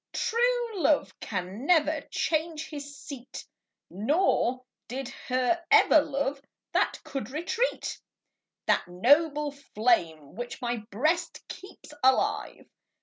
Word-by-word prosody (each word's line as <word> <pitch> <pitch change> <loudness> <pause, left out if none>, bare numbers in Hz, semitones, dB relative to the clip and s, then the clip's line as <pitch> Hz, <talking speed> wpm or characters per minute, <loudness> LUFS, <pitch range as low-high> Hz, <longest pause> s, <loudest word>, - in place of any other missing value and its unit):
True 475 -3 0
love 295 0 +2
can 195 +6 -5
never 315 -3 +3
change 315 -1 -1
his 285 -1 -7
seat; 265 -3 -9 0.5
Nor 255 - +1 0.2
did 265 0 -5 0.2
he 255 -1 +2 0.2
ever 310 - +7
love 280 -1 -2 0.3
that - - +1
can 275 - -4
retreat. 345 - -2 0.7
That - - +2
noble 290 - +3
flame, 215 - 0
which 240 +3 -6
my 240 -2 -1
Ijreast 315 - -1
keeps 375 -5 -11
alive. 260 0 +2
280 Hz, 105 wpm, -28 LUFS, 245-315 Hz, 0.7 s, ever